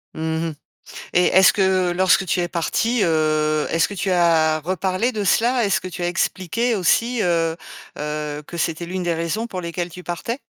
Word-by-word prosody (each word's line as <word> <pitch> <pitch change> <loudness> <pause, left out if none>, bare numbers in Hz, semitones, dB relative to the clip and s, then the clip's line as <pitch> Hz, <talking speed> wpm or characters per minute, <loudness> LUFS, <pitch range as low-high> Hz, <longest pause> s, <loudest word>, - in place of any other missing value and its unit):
Mmh 160 +1 -2
mh. - - -7 0.6
Et 180 0 +4
est-ce 190 +1 +6
que 190 -2 +1
lorsque 190 +2 +3
tu 180 - 0
es 175 - 0
partie, 225 +7 0
heu, 155 -2 +1
est-ce 165 - +2
que 205 - -6
tu 195 0 -2
as 160 -3 +3
reparlé 185 +7 -1
de 210 -3 -3
cela? 240 +4 +2
Est-ce 200 - +1
que 185 - -6
tu 180 0 -6
as 175 - 0
expliqué 190 +6 -1
aussi, 230 +5 +1
heu 165 -3 +1 0.4
heu, 150 0 -4
que 175 - -9
c'était 165 +1 -2
l'une 185 +1 -4
des 175 -1 0
raisons 170 +8 -2
pour 185 -4 -6
lesquelles 170 +1 -4
tu 180 +2 -11
partais? 230 +10 -4
175 Hz, 195 wpm, -21 LUFS, 165-190 Hz, 0.6 s, est-ce